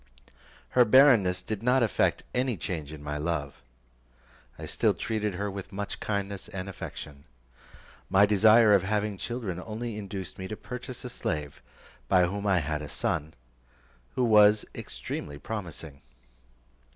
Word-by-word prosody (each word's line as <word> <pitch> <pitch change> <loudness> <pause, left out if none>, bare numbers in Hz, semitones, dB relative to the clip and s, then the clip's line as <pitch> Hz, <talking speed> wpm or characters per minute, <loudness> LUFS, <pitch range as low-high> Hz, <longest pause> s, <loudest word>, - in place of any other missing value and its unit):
Her 125 - +5
barrenness 115 -7 +5
did 110 -2 -4
not 125 +2 +3
effect 110 - +1
any 125 -3 0
change 80 -3 -4
in 75 -2 -9
my 75 0 -3
love; 75 -4 -3 1.0
I - - -7
still - - +1
treated 105 -3 -2
her 100 +2 -2
with 95 -1 -7
much 100 +1 -5
kindness 100 -1 -3
and 95 -3 -6
affection. 75 -6 -8 0.8
My 100 +2 +6
desire 110 +2 +6
of 100 - +5
having 105 +1 -1
children 110 -8 -4
only 110 0 -5
induced 95 -3 -6
me 95 - -4
to 110 - -6
purchase 125 0 -7
a - - -4
slave, 75 - -4 0.5
by 90 +4 +5
whom 100 +3 -3
I 95 -3 +3
had 75 0 -2
a 75 - -7
son, 80 +1 -2 0.8
who 125 - +1
was 105 -2 +6
extremely 70 0 -6
promising. 80 -6 -7
100 Hz, 145 wpm, -28 LUFS, 85-110 Hz, 1.0 s, My